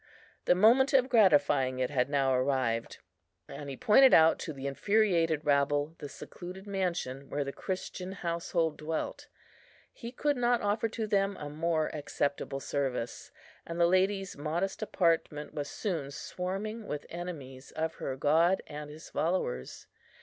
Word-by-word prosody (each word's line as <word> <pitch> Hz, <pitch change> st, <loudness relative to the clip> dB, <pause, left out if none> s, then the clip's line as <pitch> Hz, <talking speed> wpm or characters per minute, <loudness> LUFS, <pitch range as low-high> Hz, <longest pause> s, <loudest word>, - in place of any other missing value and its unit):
The -, -, +5 dB
moment 245 Hz, +9 st, +5 dB
of 260 Hz, -1 st, +4 dB
gratifying 145 Hz, -, +4 dB
it 130 Hz, +1 st, -1 dB
had 130 Hz, -2 st, +1 dB
now 135 Hz, -2 st, +2 dB
arrived, 130 Hz, -3 st, 0 dB, 0.5 s
and 140 Hz, +1 st, -8 dB
he 135 Hz, -, -6 dB
pointed 265 Hz, +5 st, +6 dB
out 160 Hz, 0 st, +6 dB
to 165 Hz, -, -4 dB
the 135 Hz, -2 st, -8 dB
infuriated 165 Hz, 0 st, +2 dB
rabble 145 Hz, +1 st, +2 dB
the 145 Hz, -, -7 dB
secluded 185 Hz, +6 st, -9 dB
mansion 175 Hz, -9 st, -3 dB
where 145 Hz, -, -1 dB
the 140 Hz, 0 st, -5 dB
Christian 185 Hz, 0 st, -5 dB
household 170 Hz, -3 st, -1 dB
dwelt. 155 Hz, +1 st, -4 dB, 0.7 s
He 235 Hz, -2 st, -8 dB
could 290 Hz, +2 st, 0 dB
not 240 Hz, 0 st, +2 dB
offer 210 Hz, +2 st, +1 dB
to 225 Hz, 0 st, -3 dB
them 200 Hz, -2 st, +1 dB
a 150 Hz, -, -6 dB
more 160 Hz, 0 st, 0 dB
acceptable 145 Hz, -2 st, -2 dB
service, 135 Hz, -4 st, -3 dB, 0.3 s
and 170 Hz, +1 st, -6 dB
the 170 Hz, -, +6 dB
lady's 190 Hz, +2 st, +1 dB
modest 165 Hz, +8 st, -2 dB
apartment 165 Hz, -7 st, 0 dB
was 145 Hz, -1 st, -4 dB
soon 165 Hz, -10 st, -3 dB
swarming 195 Hz, +9 st, -5 dB
with 150 Hz, -, -4 dB
enemies 145 Hz, -7 st, -7 dB
of 160 Hz, 0 st, -2 dB
her 130 Hz, -, -2 dB
God 160 Hz, +7 st, +3 dB
and 150 Hz, 0 st, -8 dB
His 155 Hz, +2 st, -11 dB
followers. 155 Hz, -, -2 dB
160 Hz, 150 wpm, -30 LUFS, 140-195 Hz, 0.7 s, pointed